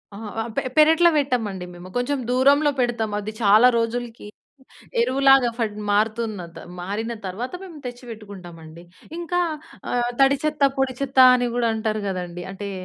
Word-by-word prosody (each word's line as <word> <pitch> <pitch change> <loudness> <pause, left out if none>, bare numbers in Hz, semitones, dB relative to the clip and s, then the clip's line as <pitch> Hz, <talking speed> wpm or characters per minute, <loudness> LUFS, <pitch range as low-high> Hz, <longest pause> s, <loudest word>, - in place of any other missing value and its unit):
అహా! 215 0 -7
ఆహ్, 230 - -5
పె - - +1 0.2
పెరట్లో 320 +3 +6
పెట్టమండి 225 -10 -1
మేము, 175 +1 -11
కొంచెం 265 +4 -1
దూరంలో 280 +3 +4
పెడతాము. 235 -4 -1
అది 210 +1 -5
చాలా 215 +3 +6
రోజులకి, 230 -1 -3 0.7
ఎరువులాగా 270 - +4
పడి 210 -2 -3
మారుతుందత 215 -4 -1 0.2
మారిన 215 +6 -4
తర్వాత 215 +8 -5
మేము 335 -5 -11
తెచ్చి 245 0 -8
పెట్టుకుంటామండి. 175 -6 -11 0.4
ఇంకా 355 +1 -1 0.5
ఆహ్, 245 0 0
తడిచెత్త, 285 +2 +1 0.2
పొడిచెత్త 265 0 -2 0.2
అని 245 -1 -1
కూడా 235 -1 +1
అంటారు 215 -1 -2
కదండీ! 180 -1 -5
అంటే, 200 +1 -6
230 Hz, 135 wpm, -22 LUFS, 205-265 Hz, 0.7 s, పెరట్లో